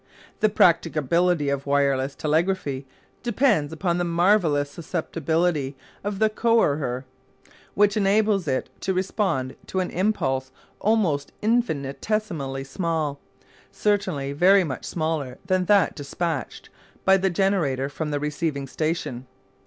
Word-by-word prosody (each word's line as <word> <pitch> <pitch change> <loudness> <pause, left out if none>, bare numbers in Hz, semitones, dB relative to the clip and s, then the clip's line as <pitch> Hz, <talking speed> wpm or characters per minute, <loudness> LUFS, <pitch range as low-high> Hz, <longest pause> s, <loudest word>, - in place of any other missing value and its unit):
The 215 - +4
practicability 170 -3 +2
of 140 0 -2
wireless 140 -1 +1
telegraphy 155 -4 -1 0.3
depends 230 - +2
upon 170 +2 -1
the - - +1
marvellous 170 -4 +2
susceptibility 160 -3 -1 0.3
of 205 0 -3
the 220 +2 +4
"coherer," 150 - +1 0.7
which 205 +1 +4
enables 205 -2 +2
it 130 -2 -1
to 190 - -1
respond 185 - -1
to 190 - -2
an 185 - -2
impulse 150 -9 0 0.3
almost 185 -10 +1
infinitesimally 160 - -1
small, 155 0 -2 0.5
certainly 185 -10 0
very 185 +6 +5
much 140 -6 -5
smaller 155 -6 -2
than 185 -1 +1
that 200 -1 +4
despatched 150 -2 -4 0.3
by 190 - +6
the 190 0 +2
generator 170 -8 +1
from 150 +2 -4
the 145 -1 -1
receiving 150 -1 -2
station. 150 -3 -3
165 Hz, 115 wpm, -24 LUFS, 140-195 Hz, 0.7 s, by